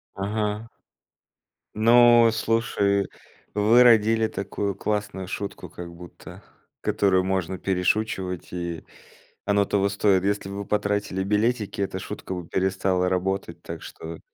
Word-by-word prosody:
Ага. 105 +2 -2 1.1
Ну, 120 +1 +6
слушай, 110 -3 +1 0.5
вы 110 +4 +5
родили 115 -1 +5
такую 100 0 -3
классную 105 -3 -3
шутку, 100 +1 -5
как 85 -1 -8
будто, 85 0 -12 0.4
которую 95 -2 +2
можно 95 -1 -1
перешучивать, 95 0 -1
и 85 -2 -5 0.6
оно 100 0 +3
того 100 0 +1
стоит. 100 -1 +2
Если 100 -1 -1
бы 100 - -6
вы 100 - -5
потратили 100 -2 -1
билетики, 105 +2 0
эта 95 -1 -2
шутка 95 - -6
бы 90 -2 -6
перестала 95 0 0
работать, 95 -2 -2
так 85 -1 -7
что 80 0 -9
100 Hz, 120 wpm, -24 LUFS, 95-105 Hz, 1.1 s, Ну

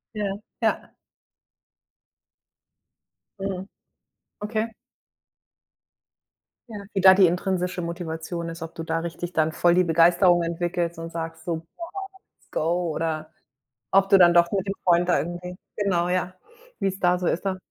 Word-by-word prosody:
Ja, 205 -1 -2 0.2
ja. - - -1 2.5
Mhm. 195 -1 -4 0.8
Okay. 220 +1 -2 2.0
Ja, 220 - -7 0.2
wie 195 - 0
da 190 0 +9
die 190 -1 +6
intrinsische 180 0 -1
Motivation 170 0 -5
ist, 165 0 -7
ob 165 - -8
du 165 - -7
da 165 0 -1
richtig 170 +1 -5
dann 160 0 +2
voll 175 +1 +3
die 180 - +5
Begeisterung 175 +2 +4
entwickelst 170 0 -2
und 165 0 -7
sagst 165 -1 -6
so: 170 -2 -1
„Boah, 170 - -10 0.5
let's - - -32
go”, 170 +2 0
oder 160 0 -3 0.6
ob 195 0 +4
du 195 -1 +7
dann 175 -1 +7
doch 170 0 +5
mit 195 -1 -1
dem 195 - 0
Freund 175 0 +3
da - - +4
irgendwie 175 +2 -5 0.2
genau, 180 -4 0
ja, 185 0 -1 0.4
wie's 195 0 -1
da 180 -1 +3
so 180 - -4
ist 170 - 0
dann. 190 -1 -1
175 Hz, 145 wpm, -25 LUFS, 165-190 Hz, 2.5 s, da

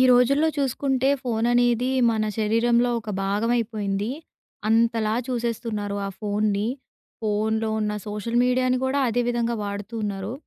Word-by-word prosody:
రోజుల్లో 275 +5 +4
చూసుకుంటే, 270 -1 0
ఫోను 230 -2 0
అనేది, 245 0 +3 0.2
మన 220 -1 0
శరీరంలో 235 +3 +2
ఒక 215 - -7
భాగవయిపోయింది. 210 -1 -1 0.6
అంతలా 225 -1 +2
చూసేస్తున్నారు 230 -4 -2
ఆ - - -3
ఫోనుని. 210 0 0 0.5
ఫోనులో 220 +1 0
ఉన్న 210 -1 0
సోషల్ 210 +3 -2
మీడియాని 255 0 +2
గూడా, 270 +2 +1
అదే 245 +1 +1
విధంగా 235 -1 0
వాడుతూ 205 +2 -5
ఉన్నారు. 195 +1 -3
230 Hz, 120 wpm, -24 LUFS, 210-245 Hz, 0.6 s, రోజుల్లో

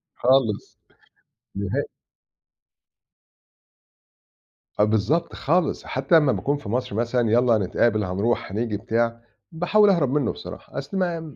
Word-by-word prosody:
خالص. 125 -5 +1 0.8
نهائي. 100 +8 -1 3.0
آه - - +6
بالضبط، 110 - +1
خالص. 175 +4 0
حتى 135 +5 +2
أمّا 150 -4 +3
باكون 145 +2 -1
في 145 - -9
مصر 120 -2 -2
مثلًا، 120 0 0
يالّا 120 0 +4
هنتقابل، 105 +2 +1
هنروح، 100 +4 -1
هنيجي 110 +1 -2
بتاع، 115 +2 -1 0.3
باحاول 200 +6 +3
أهرب 170 -9 +2
منُّه 140 -4 +1
بصراحة، - - -10
أصل 140 +8 -4
ما 165 -5 -2
125 Hz, 115 wpm, -23 LUFS, 110-150 Hz, 3.0 s, آه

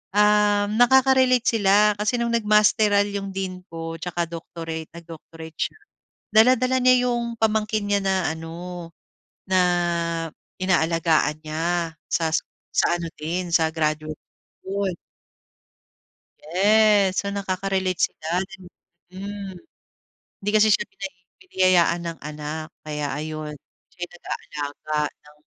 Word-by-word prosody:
um, 210 0 +3
nakaka-relate 260 0 +5
sila. 210 -1 +4
Kasi 215 +4 +1
no’ng 235 0 0
nag-masteral 210 -1 +4
yung 195 -1 -4
dean 185 -1 -4
ko 165 0 -5
tsaka 175 0 -2
doctorate, 165 -1 -6
nag-doctorate 165 -1 -11
siya, - - -2 0.6
dala-dala 255 +3 +5
niya 250 0 +4
yung 235 -1 -2
pamangkin 215 -1 +1
niya 205 0 +3
na 195 0 +1 0.2
ano, 170 +2 -8 0.6
na 185 0 +4 1.0
inaalagaan 165 -4 +2
niya 165 +2 -1 0.2
sa 165 -1 +1
s - - +4 0.3
sa 175 - +2
ano 170 -1 -4
din, 175 +3 -3
sa 160 -2 +4
graduate 155 -1 -1 0.5
school. 195 0 -2 1.5
Yes. 200 +2 +4
So, 200 - -5
nakaka-relate 190 -1 -1
sila, 155 - -11 0.2
then 195 0 -13 0.5
hmm. 200 +1 -6 0.9
Hindi 200 - -1
kasi 215 0 +5
siya - - +1
binay 195 -1 -7 0.3
biniyayaan 185 - +3
ng 165 -1 -5
anak, 150 +1 -6 0.2
kaya 150 -1 -3
ayun, 155 0 -5 0.4
siya - - -32
yun - - -22
nag-aalaga 150 -2 -5 0.3
ng 150 0 -19
185 Hz, 120 wpm, -23 LUFS, 165-210 Hz, 1.5 s, nakaka-relate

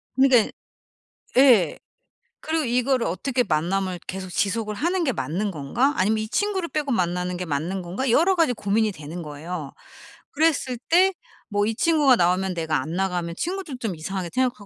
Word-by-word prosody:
그러니까는 260 -4 +4 0.9
예. 250 -8 +5 0.6
그리고 320 0 -1
이거를 250 +1 +1
어떻게 250 +8 0
만남을 185 +1 -1
계속 185 0 -5
지속을 210 +3 -1
하는 345 - 0
게 280 - +1
맞는 200 0 -2
건가? 190 - 0
아니면 215 +4 +2
이 215 - -3
친구를 385 - -1
빼고 295 -2 -2
만나는 180 -3 0
게 180 +1 -4
맞는 165 +5 -2
건가? 185 +10 -3
여러 350 +9 +4
가지 330 -7 +3
고민이 215 0 0
되는 160 0 -8
거예요. 150 0 -6 0.6
그랬을 290 -5 +1
때 370 +3 +5 0.4
뭐 205 -1 +1
이 225 +1 -1
친구가 295 -3 +4
나오면 185 +1 +1
내가 160 -3 0
안 155 +4 -6
나가면 180 -2 -2
친구들도 355 -6 -4
좀 220 -7 -3
이상하게 180 +3 -4
생각할 255 -1 +1
210 Hz, 365 characters per minute, -24 LUFS, 180-270 Hz, 0.9 s, 예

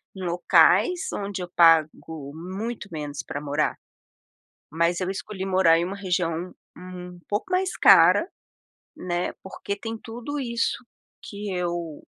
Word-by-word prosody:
em 190 - -7
locais 180 - +3
onde 200 -2 -4
eu 180 - -6
pago 160 -3 +3
muito 200 +6 -6
menos 150 -3 -5
pra 145 - -5
morar, 145 +1 -1 0.9
mas 170 +2 +1
eu 185 -1 -2
escolhi 190 0 -5
morar 185 -3 +4
em 170 - 0
uma 195 +2 -5
região 180 -2 -2 0.2
um 180 -1 -9
pouco 205 +1 -1
mais 370 0 0
cara, 335 - +6 0.7
né, 175 0 -2
porque 195 +1 -5
tem 225 +2 -6
tudo 240 +6 -6
isso 235 -1 -2 0.4
que 205 -1 -6
eu 170 -3 -3
185 Hz, 135 wpm, -25 LUFS, 170-205 Hz, 0.9 s, cara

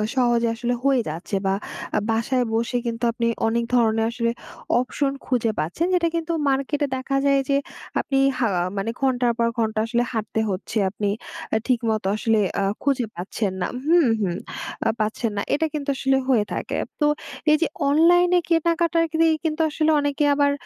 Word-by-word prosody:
সহজে 240 -2 +2
আসলে 240 +1 -1
হয়ে 270 -2 +3
যাচ্ছে 165 +6 -5
বা 190 - +2 0.4
আ - - +4
বাসায় 245 +3 +1
বসে 230 +2 0
কিন্তু 230 +1 -4
আপনি 235 0 -1 0.2
অনেক 235 +1 +1
ধরনের 225 -2 +3
আসলে 235 -1 0 0.5
অপশন 275 +2 -1
খুঁজে 235 -3 +1
পাচ্ছেন, 175 - -1
যেটা 345 -2 +3
কিন্তু 335 0 -2 0.2
মার্কেটে 275 +2 0
দেখা 270 +1 -1
যায় 275 0 +4
যে 275 - +4 0.4
আপনি 270 - -1 0.2
হা 245 - +2
অ্যা 175 - +1
মানে 210 +4 -1
ঘন্টার 250 -2 +2
পর 235 -1 +2
ঘন্টা 220 -1 0
আসলে 235 +1 +1
হাঁটতে 220 -1 -2
হচ্ছে, 195 +3 -3
আপনি 205 +1 -2 0.5
আ - - +5
ঠিকমত 230 -4 +1
আসলে 225 0 +1 0.2
অ্যা 200 - +1 0.2
খুঁজে 275 -4 +1
পাচ্ছেন 190 +3 -3
না - - +1 0.2
হুম, 335 -2 +5
হুম, 180 -4 0 0.5
আ - - +3
পাচ্ছেন 215 +1 -1
না। - - +1
এটা 310 +3 +2
কিন্তু 290 -2 -3
আসলে 270 0 +2
হয়ে 240 -6 +3
থাকে। - - -3 0.2
তো 300 - +3 0.5
এইযে 305 +2 +3 0.2
অনলাইনে 350 +4 +5
কেনাকাটার 335 0 +2 0.3
দিয়ে 325 -1 +4
কিন্তু 320 0 -1
আসলে 310 +1 +1
অনেকে 290 +1 0
আবার 285 0 +3
250 Hz, 170 wpm, -23 LUFS, 225-290 Hz, 0.5 s, আ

